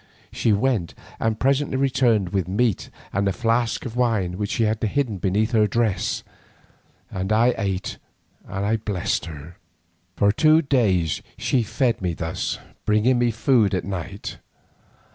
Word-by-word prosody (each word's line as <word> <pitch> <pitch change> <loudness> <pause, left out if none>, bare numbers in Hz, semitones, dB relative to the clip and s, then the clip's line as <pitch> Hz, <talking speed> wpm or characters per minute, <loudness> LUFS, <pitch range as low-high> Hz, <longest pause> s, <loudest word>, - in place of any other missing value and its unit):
She 115 - +1
went 105 -4 0 0.2
and 110 -1 0
presently 135 0 +1
returned 125 -7 +2
with 95 -3 -1
meat 105 +2 0 0.2
and 100 +1 +1
a - - +2
flask 115 +2 0
of 120 -2 -6
wine 110 -8 +1
which 100 -1 -2
she 115 - 0
had 110 0 0
hidden 110 -2 -1
beneath 105 +5 +1
her 110 -3 +4
dress, 110 -3 0 0.9
and 95 +2 -3
I 115 +3 +4
ate 95 -1 -3 0.5
and 105 +3 -1
blessed 95 -4 -1
her. 80 +2 -10 0.6
For 100 0 +3
two 155 +8 +4
days 100 - +1 0.2
she 130 - +1
fed 115 +1 0
me 90 -3 -1
thus, 80 0 -3 0.3
bringing 110 +4 +3
me 120 0 +3
food 110 -3 +2
at 90 - -2
night. 100 +1 -6
110 Hz, 145 wpm, -23 LUFS, 95-120 Hz, 0.9 s, her